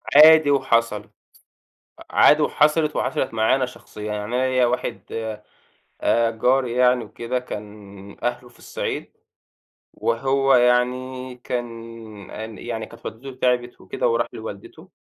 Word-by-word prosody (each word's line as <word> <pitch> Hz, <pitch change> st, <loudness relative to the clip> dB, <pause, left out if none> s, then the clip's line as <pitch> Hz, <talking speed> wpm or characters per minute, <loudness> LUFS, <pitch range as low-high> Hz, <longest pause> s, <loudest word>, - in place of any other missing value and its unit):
عادي 155 Hz, 0 st, +8 dB
وحصلت، 115 Hz, -6 st, +1 dB, 0.9 s
أ -, -, -11 dB
عادي 150 Hz, +1 st, +5 dB
وحصلت 150 Hz, +1 st, +2 dB
وحصلت 140 Hz, -5 st, -1 dB
معايا 110 Hz, +3 st, +3 dB
أنا 135 Hz, -1 st, 0 dB
شخصيًا، 125 Hz, -3 st, -11 dB
يعني 105 Hz, 0 st, -3 dB
أنا 130 Hz, +1 st, +1 dB
ليَّ 130 Hz, -1 st, +3 dB
واحد 120 Hz, -1 st, -2 dB, 1.0 s
آآ 115 Hz, 0 st, +3 dB
جاري 125 Hz, +2 st, +1 dB
يعني 125 Hz, 0 st, +3 dB
وكده، 120 Hz, +2 st, -4 dB
كان 105 Hz, -4 st, -10 dB
أهله 120 Hz, 0 st, -2 dB
في 120 Hz, -, -23 dB
الصعيد -, -, -5 dB, 0.8 s
وهو 135 Hz, +3 st, +1 dB
يعني 125 Hz, +1 st, +1 dB
كان 120 Hz, -2 st, -5 dB, 0.4 s
أن 110 Hz, 0 st, -7 dB
يعني، 115 Hz, -2 st, -5 dB
كانت -, -, -13 dB
والدته 130 Hz, +5 st, -7 dB
تعبت 125 Hz, -1 st, 0 dB
وكده -, -, -2 dB
وراح 115 Hz, 0 st, +1 dB
لوالدته، 105 Hz, -3 st, -9 dB
125 Hz, 130 wpm, -22 LUFS, 115-130 Hz, 1.0 s, عادي